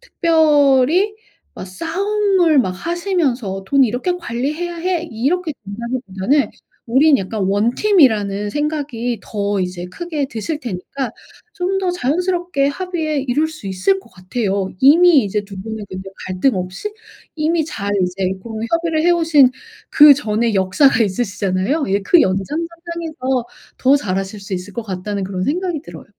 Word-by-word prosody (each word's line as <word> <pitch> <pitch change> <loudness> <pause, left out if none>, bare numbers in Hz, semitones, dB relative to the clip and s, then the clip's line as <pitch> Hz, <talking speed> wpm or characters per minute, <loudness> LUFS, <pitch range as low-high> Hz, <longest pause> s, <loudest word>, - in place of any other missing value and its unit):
특별히 320 - +3 0.4
뭐 - - -6
싸움을 355 - +1
막 190 -8 +2
하시면서 275 - -2
"돈 275 -1 +4
이렇게 250 +10 -1
관리해야 305 +5 -3
해." 345 0 -1
이렇게 310 +9 -1
된다기보다는 235 +3 -1 0.4
우린 275 +5 +5
약간 195 +1 -3
1 205 +5 +1
팀이라는 215 - +3
생각이 280 -6 -2
더 205 -1 -2
이제 180 -1 -4
크게 310 - -4
드실 290 +8 -4
테니까 235 +4 -5 0.4
좀 385 +1 -1
더 370 -2 0
자연스럽게 350 0 0
합의에 310 -3 -2
이룰 300 +6 +2
수 310 -10 -10
있을 190 - +1
것 - - -21
같아요. 195 0 -2
이미 310 -1 +6
이제 205 +1 -2
2 195 -1 -10
분은 220 -1 -6
근데 190 +1 -7 0.2
갈등 185 +6 +1
없이 185 - -4 0.4
이미 320 +1 +1
잘 200 -9 -4
이제 185 +1 -1
고런 225 0 -5
협의를 335 -2 +1
해 - - +5
오신 320 -6 +5 0.4
그전의 235 -7 +5
역사가 225 +6 +3
있으시잖아요. 200 - -1
예 200 +1 +1
'그 330 - +4
연장 190 +1 +1
선상에서 330 -5 -3 0.3
더 270 +2 +4
잘하실 195 -3 -3
수 195 - -9
있을 185 +2 -6
것 235 - -4
같다.'는 200 0 -4
그런 185 -1 -3
생각이 350 0 -1
들어요. 170 -2 -11
265 Hz, 305 characters per minute, -18 LUFS, 200-330 Hz, 0.4 s, 이미